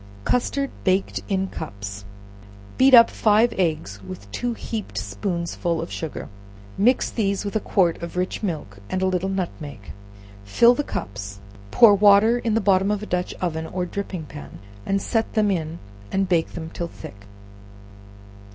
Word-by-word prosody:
Custard 275 +3 0
baked 190 0 +1
in 190 -1 +1
Cups. 100 0 -7 0.7
Beat 260 0 +8
up 230 -1 +8
five 220 +2 +3
eggs 155 - -1
with 100 +2 -10
two 240 - -2
heaped 210 - -6
spoonsful 170 - -2
of 165 - -5
sugar, 160 -2 -5 0.5
mix 245 +6 +2
these 200 -3 -1
with 200 - -4
a - - +3
quart 180 -5 +1
of 170 +1 -6
rich 180 +1 -2
milk 155 - -4
and 185 0 -1
a - - +3
little 185 0 0
nutmeg; 150 - -5 0.5
fill 235 - +5
the 290 - -1
cups, 100 - -6 0.3
pour 215 - +7
water 205 +4 +5
in 225 -2 0
the - - +3
bottom 195 -1 +3
of 210 0 -1
a - - -4
dutch 180 -3 -2
oven 160 -3 -2
or 180 +1 -3
dripping 185 -3 -5
pan, 145 0 -10 0.3
and 195 0 0
set 225 -1 -1
them 210 -2 +3
in 165 -3 -2 0.3
and 195 0 +1
bake 170 -3 +1
them 160 -1 -6
till 170 - -3
thick. 100 -10 -12
185 Hz, 160 wpm, -23 LUFS, 155-210 Hz, 0.7 s, Beat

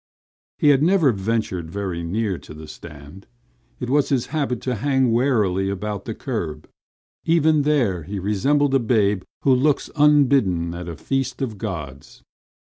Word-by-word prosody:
He 150 - +3
had 140 -1 +4
never 165 -4 +4
ventured 95 -5 -2
very 95 -2 -4
near 95 +2 -2
to 75 - -12
the 80 0 -10
stand. 75 +3 -12 0.5
It 125 - -4
was 145 +3 +2
his 130 -4 +1
habit 140 -6 -1
to 130 - -2
hang 130 -3 +2
warily 105 -7 +1
about 100 +1 -4
the 115 - -5
curb. 85 - -5 0.6
Even 160 -2 +3
there 130 - +1
he 100 +6 -6
resembled 135 +9 +1
a 135 - +4
babe 105 -5 +1 0.2
who 135 - +4
looks 140 +3 +1
unbidden 135 - +3
at 85 0 -6
a 85 - -6
feast 135 - -2
of 110 -6 -5
gods. 75 -10 -7
110 Hz, 155 wpm, -22 LUFS, 90-135 Hz, 0.6 s, had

